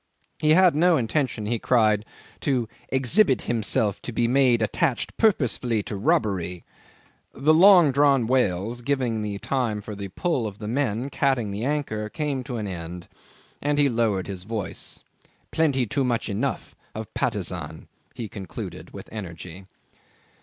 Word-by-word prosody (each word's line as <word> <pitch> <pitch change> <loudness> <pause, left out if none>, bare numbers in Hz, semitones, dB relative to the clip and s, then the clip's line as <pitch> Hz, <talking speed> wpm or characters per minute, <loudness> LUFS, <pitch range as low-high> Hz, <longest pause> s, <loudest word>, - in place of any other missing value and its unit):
He 155 0 +4
had 185 -1 +6
no 170 +1 +4
intention, 125 -3 -1
he 115 +2 -1
cried, 110 -4 +2 0.3
to 125 -5 0 0.2
"exhibit 135 - +3
himself 110 -3 0
to - - -6
be 120 +1 +1
made 125 -2 +3
attached 130 +3 0
purposefully 125 - +1
to 105 - -5
robbery." 100 - 0 0.7
The 150 +4 +3
long 175 -2 +7
drawn 140 -2 +4
wails, 115 -2 0
giving 125 -4 0
the 105 -1 -3
time 120 -2 -1
for 105 +1 -8
the 100 -1 -6
pull 125 - -1
of 100 -2 -8
the 105 - -7
men 125 +1 -1
catting 130 -7 +1
the 105 +4 -3
anchor, 135 -8 -2
came 145 -1 -2
to 125 - -4
an 110 - -3
end, 90 -2 -7 0.5
and 145 0 0
he 145 -1 +4
lowered 115 -6 0
his 95 -2 -6
voice. 105 -1 -5 0.5
"Plenty 140 -6 +2
too 135 +6 0
much 120 -3 -1
enough 115 +7 -3 0.2
of - - -7
Patusan," - - -2 0.3
he 115 - -5
concluded, 95 -4 -8
with - - -9
energy. 90 -2 -8
120 Hz, 150 wpm, -25 LUFS, 105-140 Hz, 0.7 s, long